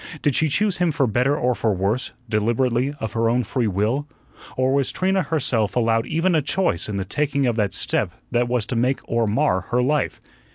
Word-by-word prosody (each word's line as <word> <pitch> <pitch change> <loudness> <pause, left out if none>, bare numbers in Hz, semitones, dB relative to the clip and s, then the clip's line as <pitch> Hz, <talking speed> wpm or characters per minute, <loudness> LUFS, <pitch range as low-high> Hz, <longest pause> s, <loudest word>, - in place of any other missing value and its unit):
Did 145 - +2
she 160 - +2
choose 200 +6 +1
him 175 -2 +2
for 145 -3 +1
better 125 +5 +1
or 125 -2 +1
for 110 0 0
worse, 100 +7 -1 0.2
deliberately, 120 +4 +1
of 110 -2 -4
her 115 -1 +1
own 125 +2 +1
free 120 +1 -1
will, 110 +9 0 0.5
or 130 +1 +2
was 140 -2 +1
Trina 190 +1 +1
herself 130 - 0
allowed 115 -2 +1
even 170 +3 +1
a 155 - +3
choice 145 - 0
in 100 - -3
the 95 - -2
taking 140 +5 0
of 120 -2 +1
that 105 -3 +1
step - - 0 0.2
that 120 0 +1
was 120 -3 0
to 125 - -4
make 125 +3 +1
or 115 -1 +1
mar 95 -3 +1
her 125 +1 +2
life? 150 +2 0
125 Hz, 210 wpm, -22 LUFS, 110-145 Hz, 0.5 s, a